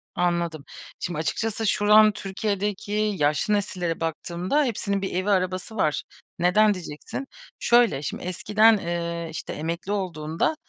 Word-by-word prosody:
Anladım. 170 Hz, -4 st, -1 dB, 0.3 s
Şimdi, 175 Hz, -4 st, -3 dB
açıkçası, 220 Hz, +8 st, -1 dB
şu 205 Hz, +1 st, +1 dB
an 215 Hz, 0 st, +8 dB
Türkiye’deki 200 Hz, 0 st, -3 dB, 0.3 s
yaşlı 150 Hz, +7 st, +1 dB
nesillere 180 Hz, -4 st, -1 dB
baktığımda 175 Hz, -, -1 dB
hepsinin 200 Hz, -5 st, -1 dB
bir 195 Hz, -, -3 dB
evi, 185 Hz, +3 st, 0 dB
arabası 185 Hz, +2 st, 0 dB
var. 155 Hz, -8 st, +1 dB, 0.4 s
Neden, 205 Hz, +5 st, +4 dB
diyeceksin. 180 Hz, -, -7 dB, 0.3 s
Şöyle, 235 Hz, -, +4 dB
şimdi, 145 Hz, -, -5 dB
eskiden, 215 Hz, +5 st, +4 dB
eee, 170 Hz, -2 st, -3 dB
işte, 160 Hz, -, -6 dB
emekli 170 Hz, +5 st, -4 dB
olduğunda, 175 Hz, -, -1 dB
185 Hz, 130 wpm, -25 LUFS, 170-210 Hz, 0.4 s, an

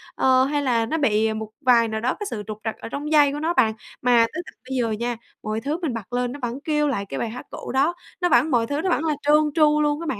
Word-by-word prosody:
ờ, 260 Hz, 0 st, +4 dB
hay 290 Hz, +1 st, 0 dB
là 235 Hz, -4 st, +2 dB
nó 315 Hz, +8 st, -2 dB
bị 220 Hz, -6 st, +2 dB
một 220 Hz, 0 st, -5 dB
vài 240 Hz, -4 st, +4 dB
nào 220 Hz, 0 st, -3 dB
đó 255 Hz, +3 st, 0 dB
cái 415 Hz, -, -3 dB
sự 210 Hz, -, -5 dB
trục 215 Hz, -1 st, -6 dB
trặc 220 Hz, -, -3 dB
ở -, -, -8 dB
trong 290 Hz, +5 st, -5 dB
dây 295 Hz, -2 st, +5 dB
của 295 Hz, -, -4 dB
nó 325 Hz, +3 st, 0 dB
bạn. 220 Hz, -9 st, +3 dB, 0.3 s
Mà 245 Hz, -2 st, +5 dB
tới 335 Hz, -, -3 dB
tận -, -, -12 dB, 0.2 s
bây 265 Hz, -, -2 dB
giờ 235 Hz, -3 st, 0 dB
nha, 235 Hz, +3 st, -2 dB, 0.3 s
mọi 215 Hz, +1 st, -2 dB
thứ 290 Hz, +5 st, -2 dB
mình 310 Hz, -8 st, -1 dB
bật 230 Hz, 0 st, -7 dB
lên 245 Hz, 0 st, 0 dB
nó 285 Hz, -, -8 dB
vẫn 245 Hz, +1 st, -3 dB
kêu 300 Hz, -1 st, +1 dB
lại 225 Hz, -8 st, -1 dB
cái 135 Hz, -8 st, -5 dB
bài 230 Hz, -, -2 dB
hát 245 Hz, +3 st, -8 dB
cũ -, -, -7 dB
đó, 275 Hz, +6 st, +2 dB, 0.3 s
nó 355 Hz, -, +2 dB
vẫn 275 Hz, +4 st, +4 dB
mọi 235 Hz, -3 st, +2 dB
thứ 285 Hz, +3 st, -1 dB
nó 380 Hz, -, -1 dB
vẫn 330 Hz, -, +1 dB
là 310 Hz, -, +2 dB
trơn 295 Hz, +1 st, +4 dB, 0.2 s
tru 300 Hz, -2 st, +4 dB
luôn 295 Hz, +1 st, +1 dB
á -, -, -5 dB
bạn. 260 Hz, -, -2 dB
255 Hz, 300 wpm, -23 LUFS, 230-300 Hz, 0.3 s, dây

